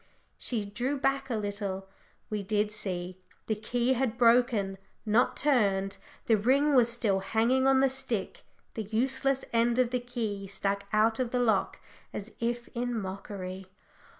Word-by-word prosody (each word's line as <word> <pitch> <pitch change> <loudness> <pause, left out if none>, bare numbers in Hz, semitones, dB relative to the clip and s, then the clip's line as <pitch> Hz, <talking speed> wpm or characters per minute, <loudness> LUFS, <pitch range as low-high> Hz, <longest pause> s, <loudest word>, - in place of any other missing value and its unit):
She 225 -5 -2
drew 245 +8 -2
back 270 0 0
a 235 - 0
little 200 -2 -3 0.4
we 210 -1 -1
did 210 +1 0
see 185 -3 -4 0.2
the 220 - 0
key 240 +4 0
had 245 -2 -1
broken, 230 -5 +3 0.3
not 225 +4 +2
turned! 200 -9 +2 0.3
the 225 - +4
ring 275 +7 +3
was 245 -3 +5
still 215 -5 +1
hanging 230 +7 +2
on 265 0 +5
the 270 - +5
stick; 260 -7 -3 0.3
the 225 - -3
useless 265 +5 0
end 235 +1 +3
of 250 -2 +2
the 250 - +1
key 225 -5 -4
stuck 200 +1 -2
out 220 +2 +3
of 255 -2 0
the 250 - 0
lock 220 -5 +1 0.3
as 210 +2 -6
if 235 0 -2
in 245 -1 -2
mockery. 190 -1 -6
225 Hz, 155 wpm, -29 LUFS, 200-250 Hz, 0.4 s, was